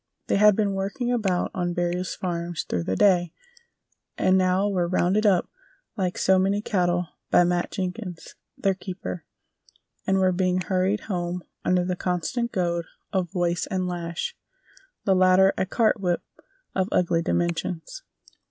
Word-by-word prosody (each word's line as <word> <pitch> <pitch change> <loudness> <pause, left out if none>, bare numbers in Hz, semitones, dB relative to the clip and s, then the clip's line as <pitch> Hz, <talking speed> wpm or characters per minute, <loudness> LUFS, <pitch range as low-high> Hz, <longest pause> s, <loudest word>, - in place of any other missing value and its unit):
They - - +1
had 210 0 +6
been 205 -2 +1
working 200 +6 -2
about 195 -7 0
on 175 -1 -2
various 175 +1 -1
farms 170 -2 -3
through 85 -2 -2
the 95 - -1
day, 175 - +3 0.8
and 185 - +3
now 185 +1 +3
were 185 -4 0
"rounded 185 +4 +2
up" 185 -4 +3 0.5
like 185 -4 -1
so 190 0 +4
many 195 +2 +2
cattle 175 -4 0 0.2
by - - +6
Matt 175 0 0
Jenkins, 185 -2 -5 0.2
their 195 -1 +2
keeper, 180 - -6 0.8
and 195 0 +3
were 185 -1 +3
being 185 0 +1
hurried 190 +3 0
home 175 -2 -3 0.2
under 180 -1 +2
the 180 0 -1
constant 180 +8 -2
goad 170 -3 -1 0.3
of 185 -3 0
voice 175 -2 0
and 185 -2 -1
lash, 175 - -4 0.7
the 195 - +4
latter 185 +1 +5
a 190 - -1
cart 220 +1 +2
whip 180 -3 0 0.5
of 190 +1 0
ugly 170 -2 +2
dimensions. 170 - -2
185 Hz, 150 wpm, -25 LUFS, 175-195 Hz, 0.8 s, had